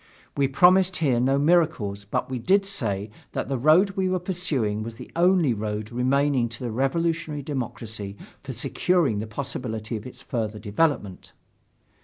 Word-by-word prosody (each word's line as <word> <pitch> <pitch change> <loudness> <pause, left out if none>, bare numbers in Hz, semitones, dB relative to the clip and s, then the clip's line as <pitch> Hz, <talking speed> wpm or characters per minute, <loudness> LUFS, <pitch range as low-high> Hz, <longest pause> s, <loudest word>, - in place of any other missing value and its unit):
We 140 -1 +2
promised 180 +6 +4
here 135 -7 +2
no 135 +3 +2
miracles 140 - +2
but 100 - -2
we 130 -1 -4
did 195 - +3
say 110 - -2 0.2
that - - -3
the 135 - 0
road 160 - +5
we 190 -1 0
were 185 - +1
pursuing 155 - -1
was 115 +1 -6
the - - -11
only 175 -5 +4
road 105 0 -4
remaining 130 0 +2
to 115 +3 -8
the 120 - -2
revolutionary 155 +4 -1
democracy 110 -7 -5 0.2
for - - -7
securing 165 - +1
the 110 - -4
possibility 110 -2 -4
of 110 +2 -6
its 125 - -12
further 110 -5 -3
development. 105 - -1
130 Hz, 160 wpm, -25 LUFS, 110-165 Hz, 0.2 s, road